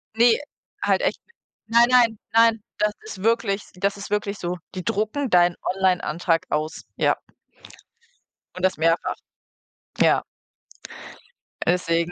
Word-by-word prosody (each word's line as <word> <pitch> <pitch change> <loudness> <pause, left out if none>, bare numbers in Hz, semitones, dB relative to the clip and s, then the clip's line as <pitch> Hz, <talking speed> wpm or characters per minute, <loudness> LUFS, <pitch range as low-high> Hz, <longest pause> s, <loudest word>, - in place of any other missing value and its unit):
Ne, 235 0 +5 0.5
halt - - +2
echt - - 0
nicht. 470 - -30 0.3
Nein, 235 +1 +5
nein, 235 -4 +4
nein, 225 -2 +4
das 210 0 +1
ist 200 -3 -9
wirklich 220 -3 +1
das 200 +2 0
ist 200 0 -8
wirklich 205 -1 -1
so. 175 +1 -3 0.2
Die 185 - -4
drucken 220 - -1
deinen 175 -2 +4
Online-Antrag 180 -3 0
aus, 155 +1 -2
ja. - - +3 1.4
Und 185 - -7
das 185 - +1
mehrfach. 165 +1 +1 0.8
Ja. - - +4 1.4
Deswegen 170 -1 +1
200 Hz, 125 wpm, -23 LUFS, 175-225 Hz, 1.4 s, Ne